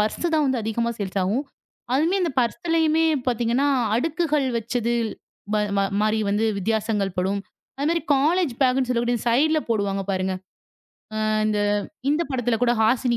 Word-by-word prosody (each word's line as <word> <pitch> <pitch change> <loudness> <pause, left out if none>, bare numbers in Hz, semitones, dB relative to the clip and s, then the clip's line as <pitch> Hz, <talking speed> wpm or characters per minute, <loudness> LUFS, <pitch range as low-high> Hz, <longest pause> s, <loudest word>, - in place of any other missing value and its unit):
Purse 215 +10 -1
தான் 265 -5 +1
அதிகமா 235 +2 -1
sales 195 -1 -3
ஆகும். 220 +10 0 0.5
அதுமே 325 +8 +2
அந்த 335 - 0
பர்ஸ்லயுமே 325 +4 +1 0.2
பார்த்தீங்கன்னா 245 +3 +1 0.3
அடுக்குகள் 300 +2 0
வச்சது 235 +1 -1 0.6
மா 200 -1 +1 0.2
மாரி 215 +1 +2
வந்து 210 +2 +1
வித்தியாசங்கள் 210 -1 -1
படும். 195 +2 0 0.4
அதே 285 - -1
மாரி 335 - +1 0.2
காலேஜ் 320 +2 +2
பேக்னு 255 -1 +2
சொல்லக்கூடிய 240 -1 +1
சைட்ல 300 +7 +3
போடுவாங்க 200 -3 0
பாருங்க. 190 0 -1 0.9
அ - - 0 0.2
இந்த 210 -1 +1 0.5
இந்தப்படத்துல 260 -7 0
கூட 240 -1 +4
ஹாசினி 240 +2 +2
240 Hz, 130 wpm, -23 LUFS, 215-285 Hz, 0.9 s, கூட